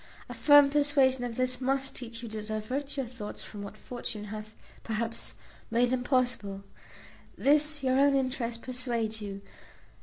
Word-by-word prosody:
A 245 Hz, -, -7 dB
firm 285 Hz, +4 st, +7 dB
persuasion 280 Hz, -3 st, +3 dB
of 240 Hz, -2 st, -3 dB
this 255 Hz, +1 st, 0 dB
must 270 Hz, +1 st, 0 dB
teach 230 Hz, -1 st, -6 dB
you 230 Hz, -, -5 dB
to 215 Hz, 0 st, -5 dB
divert 220 Hz, +7 st, -4 dB
your 270 Hz, -, 0 dB
thoughts 230 Hz, -3 st, -7 dB
from 205 Hz, -, -9 dB
what 200 Hz, +1 st, -8 dB
fortune 230 Hz, -2 st, -6 dB
hath 215 Hz, +1 st, -7 dB, 0.3 s
(perhaps) 225 Hz, +1 st, -3 dB, 0.3 s
made 240 Hz, +2 st, +2 dB
impossible. 245 Hz, -6 st, 0 dB, 0.7 s
This 300 Hz, 0 st, +4 dB
your 260 Hz, 0 st, +3 dB
own 280 Hz, 0 st, +5 dB
interest 250 Hz, -3 st, -1 dB
persuades 235 Hz, -4 st, -1 dB
you. 200 Hz, -1 st, -6 dB
245 Hz, 150 wpm, -29 LUFS, 220-270 Hz, 0.7 s, firm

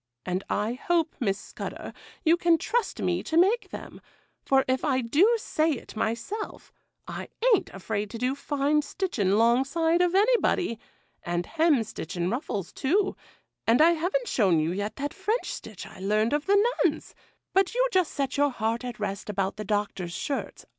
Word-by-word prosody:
And 185 Hz, +1 st, -2 dB
I 210 Hz, +3 st, 0 dB
hope, 330 Hz, +5 st, 0 dB
Miss 195 Hz, -6 st, 0 dB
Scudder, -, -, -7 dB, 0.3 s
you 325 Hz, +1 st, +6 dB
can 340 Hz, -1 st, +3 dB
trust 465 Hz, +7 st, -1 dB
me -, -, +1 dB
to 320 Hz, -, -2 dB
make 405 Hz, +7 st, +3 dB
them; -, -, -9 dB, 0.4 s
for 270 Hz, -1 st, +3 dB
if 260 Hz, 0 st, 0 dB
I 265 Hz, -4 st, +2 dB
do 325 Hz, -, +4 dB
say 320 Hz, -7 st, 0 dB
it 245 Hz, -, -9 dB
myself, 235 Hz, -, -4 dB, 0.3 s
I -, -, -6 dB, 0.3 s
a'n't 410 Hz, -, +2 dB
afraid 205 Hz, +2 st, -4 dB
to 230 Hz, -, -6 dB
do 250 Hz, +3 st, 0 dB
fine 285 Hz, +1 st, +1 dB
stitching 285 Hz, -, -1 dB
'longside 270 Hz, -, +3 dB
of 360 Hz, 0 st, +2 dB
anybody,—and 290 Hz, -, 0 dB
hemstitching 225 Hz, -, 0 dB
ruffles, 210 Hz, -, -3 dB
too; 390 Hz, +8 st, +1 dB, 0.5 s
and 230 Hz, +2 st, +5 dB
I 325 Hz, +2 st, +7 dB
haven't 365 Hz, +10 st, 0 dB
shown 190 Hz, -8 st, +3 dB
you 155 Hz, +2 st, 0 dB
yet 205 Hz, +3 st, -3 dB
that 285 Hz, +1 st, -4 dB
French 420 Hz, +5 st, -1 dB
stitch 215 Hz, -4 st, -8 dB
I -, -, -12 dB
learned 215 Hz, +5 st, +1 dB
of 295 Hz, +3 st, -1 dB
the 405 Hz, +1 st, +5 dB, 0.3 s
nuns;—but 385 Hz, +3 st, -2 dB
you -, -, +3 dB
just 370 Hz, -4 st, +2 dB
set 275 Hz, 0 st, -2 dB
your 290 Hz, 0 st, +4 dB
heart 230 Hz, -1 st, -2 dB
at 245 Hz, -3 st, -6 dB
rest 200 Hz, -1 st, -4 dB
about 195 Hz, -1 st, -1 dB
the 215 Hz, -, -4 dB
Doctor's 200 Hz, -4 st, -2 dB
shirts. 275 Hz, +9 st, -4 dB
270 Hz, 165 wpm, -27 LUFS, 210-340 Hz, 0.5 s, I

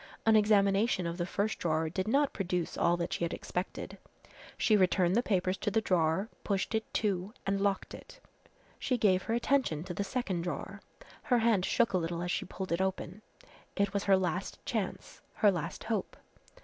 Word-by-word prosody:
An 220 Hz, 0 st, +5 dB
examination 205 Hz, -2 st, +3 dB
of 170 Hz, +2 st, -4 dB
the 175 Hz, -, -1 dB
first 210 Hz, +3 st, -1 dB
drawer 160 Hz, -1 st, 0 dB
did 185 Hz, +5 st, -3 dB
not 280 Hz, +5 st, +2 dB
produce 180 Hz, -3 st, -2 dB
all 170 Hz, +1 st, +2 dB
that 170 Hz, 0 st, -2 dB
she -, -, -2 dB
had 170 Hz, -, -1 dB
expected. 180 Hz, +1 st, -5 dB, 0.6 s
She 220 Hz, -, +3 dB
returned 185 Hz, -2 st, +3 dB
the 235 Hz, -, +4 dB
papers 185 Hz, -4 st, 0 dB
to 210 Hz, -, 0 dB
the 225 Hz, -, +2 dB
drawer, 180 Hz, -1 st, +1 dB, 0.2 s
pushed 200 Hz, +2 st, -1 dB
it 220 Hz, 0 st, -2 dB
to 200 Hz, 0 st, -1 dB
and 195 Hz, 0 st, 0 dB
locked 200 Hz, -1 st, 0 dB
it. -, -, -12 dB, 0.6 s
She 255 Hz, -, 0 dB
gave 190 Hz, -5 st, +3 dB
her 225 Hz, -, -1 dB
attention 240 Hz, -, +1 dB
to 180 Hz, 0 st, -6 dB
the 200 Hz, -, -2 dB
second 195 Hz, -4 st, -2 dB
drawer. 175 Hz, 0 st, -5 dB, 0.4 s
Her 250 Hz, -4 st, +2 dB
hand 225 Hz, -5 st, +3 dB
shook 235 Hz, -5 st, +2 dB
a 185 Hz, -, +3 dB
little 170 Hz, +1 st, -3 dB
as 175 Hz, -, -2 dB
she -, -, -1 dB
pulled 185 Hz, 0 st, -6 dB
it 170 Hz, +2 st, +1 dB
open. 190 Hz, +1 st, -3 dB, 0.5 s
It 200 Hz, -1 st, +1 dB
was 200 Hz, 0 st, -1 dB
her 195 Hz, -1 st, +5 dB
last 185 Hz, 0 st, -2 dB
chance, 215 Hz, -6 st, -4 dB
her 205 Hz, -, +5 dB
last 170 Hz, -2 st, -4 dB
hope. 220 Hz, -4 st, -3 dB
195 Hz, 190 wpm, -31 LUFS, 175-215 Hz, 0.6 s, An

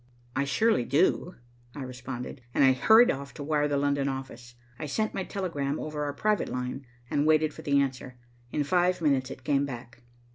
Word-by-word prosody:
"I 140 Hz, +1 st, +1 dB
surely 220 Hz, -, +2 dB
do," 165 Hz, +7 st, +1 dB, 0.4 s
I 145 Hz, -, -5 dB
responded, 125 Hz, 0 st, -7 dB
and -, -, +4 dB
I 135 Hz, -, +7 dB
hurried 220 Hz, -, +6 dB
off 140 Hz, +1 st, -6 dB
to 145 Hz, -, -6 dB
wire 150 Hz, 0 st, +1 dB
the 145 Hz, -1 st, 0 dB
London 140 Hz, 0 st, +1 dB
office. 125 Hz, -2 st, -7 dB, 0.2 s
I 155 Hz, -, -4 dB
sent 215 Hz, +9 st, -1 dB
my 190 Hz, -, -2 dB
telegram 155 Hz, -8 st, -3 dB
over 150 Hz, -1 st, -4 dB
our 145 Hz, -, -3 dB
private 210 Hz, +7 st, 0 dB
line, 125 Hz, +1 st, -4 dB, 0.2 s
and 145 Hz, +1 st, +2 dB
waited 155 Hz, -1 st, +3 dB
for -, -, -10 dB
the 140 Hz, -3 st, +2 dB
answer. 130 Hz, -2 st, -2 dB, 0.3 s
In 150 Hz, -, 0 dB
five 180 Hz, +4 st, +2 dB
minutes 140 Hz, -5 st, +1 dB
it 130 Hz, -, -9 dB
came 140 Hz, 0 st, +2 dB
back. 120 Hz, -3 st, -7 dB
140 Hz, 190 wpm, -28 LUFS, 130-155 Hz, 0.4 s, I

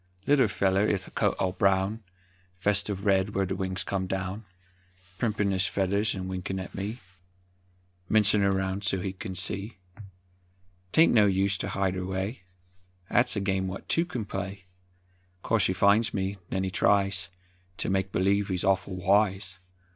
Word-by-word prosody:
Little 140 Hz, -4 st, +4 dB
feller 95 Hz, -1 st, +1 dB
'ith 100 Hz, -4 st, -1 dB
coat -, -, +1 dB
all 95 Hz, -, 0 dB
brown, 95 Hz, +3 st, +1 dB, 0.6 s
Vest 100 Hz, +1 st, +1 dB
uv 100 Hz, -1 st, -4 dB
red 100 Hz, 0 st, +2 dB
wher' 95 Hz, 0 st, +2 dB
the 95 Hz, +1 st, -3 dB
wings 95 Hz, 0 st, -3 dB
come 95 Hz, -2 st, -2 dB
down, 95 Hz, +3 st, -4 dB, 0.7 s
Primpin' 105 Hz, -4 st, 0 dB
his 95 Hz, 0 st, +1 dB
feathers 100 Hz, +3 st, 0 dB
'n 95 Hz, -1 st, -5 dB
winkin' 95 Hz, 0 st, -4 dB
at 95 Hz, -, -7 dB
me, 105 Hz, +5 st, -4 dB, 1.1 s
Mincin' 105 Hz, -1 st, +5 dB
er 100 Hz, 0 st, +3 dB
round 95 Hz, +1 st, -1 dB
so 95 Hz, -1 st, +1 dB
he 95 Hz, +1 st, -3 dB
kin 95 Hz, 0 st, -7 dB
see; 100 Hz, +4 st, -1 dB, 1.1 s
'Taint 160 Hz, -, +5 dB
no 105 Hz, -3 st, +6 dB
use 95 Hz, 0 st, +2 dB
ter -, -, -3 dB
hide 95 Hz, -1 st, 0 dB
erway, 95 Hz, +5 st, -3 dB, 0.7 s
'At's 120 Hz, 0 st, +3 dB
a -, -, 0 dB
game 95 Hz, -1 st, -1 dB
what 95 Hz, +1 st, -7 dB
two 165 Hz, +1 st, +2 dB
can 120 Hz, -10 st, -4 dB
play; 95 Hz, -1 st, -5 dB, 0.8 s
'Course 110 Hz, -4 st, +2 dB
he 95 Hz, -, 0 dB
finds 100 Hz, +4 st, +3 dB
me, 95 Hz, 0 st, -2 dB
'nen 95 Hz, 0 st, -1 dB
he 95 Hz, -, -2 dB
tries 100 Hz, 0 st, +1 dB, 0.5 s
Ter -, -, -2 dB
make 95 Hz, 0 st, 0 dB
believe 100 Hz, +2 st, +1 dB
he's 90 Hz, -3 st, -1 dB
awful 95 Hz, 0 st, +1 dB
wise. 95 Hz, -1 st, +1 dB
95 Hz, 160 wpm, -27 LUFS, 95-105 Hz, 1.1 s, no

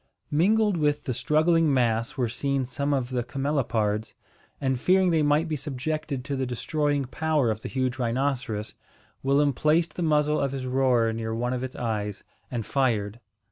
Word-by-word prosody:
Mingled 205 Hz, +5 st, +3 dB
with 150 Hz, -1 st, +1 dB
the 130 Hz, -, -2 dB
struggling 160 Hz, +4 st, +3 dB
mass 115 Hz, -2 st, +1 dB
were 125 Hz, -2 st, +1 dB
seen 135 Hz, +3 st, -1 dB
some 140 Hz, +3 st, -2 dB
of 130 Hz, -3 st, -1 dB
the 125 Hz, -1 st, 0 dB
camelopards; 120 Hz, -5 st, -1 dB, 0.4 s
and, 130 Hz, -2 st, 0 dB
fearing 185 Hz, +4 st, +3 dB
they 160 Hz, -2 st, +3 dB
might 150 Hz, +2 st, +2 dB
be 155 Hz, -, -1 dB
subjected 145 Hz, 0 st, -3 dB
to 140 Hz, -1 st, -2 dB
the 130 Hz, -1 st, -1 dB
destroying 145 Hz, +3 st, -1 dB
power 150 Hz, -2 st, +1 dB
of 110 Hz, 0 st, -4 dB
the -, -, -6 dB
huge 130 Hz, -1 st, -1 dB
rhinoceros, 120 Hz, -3 st, -1 dB, 0.5 s
Willem 140 Hz, +1 st, +3 dB
placed 155 Hz, +4 st, +2 dB
the -, -, -5 dB
muzzle 150 Hz, -2 st, +2 dB
of 140 Hz, -1 st, -1 dB
his 135 Hz, -2 st, -4 dB
roer 125 Hz, -3 st, +2 dB
near 110 Hz, 0 st, -3 dB
one 120 Hz, +2 st, -1 dB
of 125 Hz, 0 st, -3 dB
its 130 Hz, 0 st, -5 dB
eyes, 105 Hz, -4 st, -3 dB, 0.3 s
and 115 Hz, -4 st, -3 dB
fired. 115 Hz, -5 st, 0 dB
135 Hz, 175 wpm, -26 LUFS, 120-150 Hz, 0.5 s, Mingled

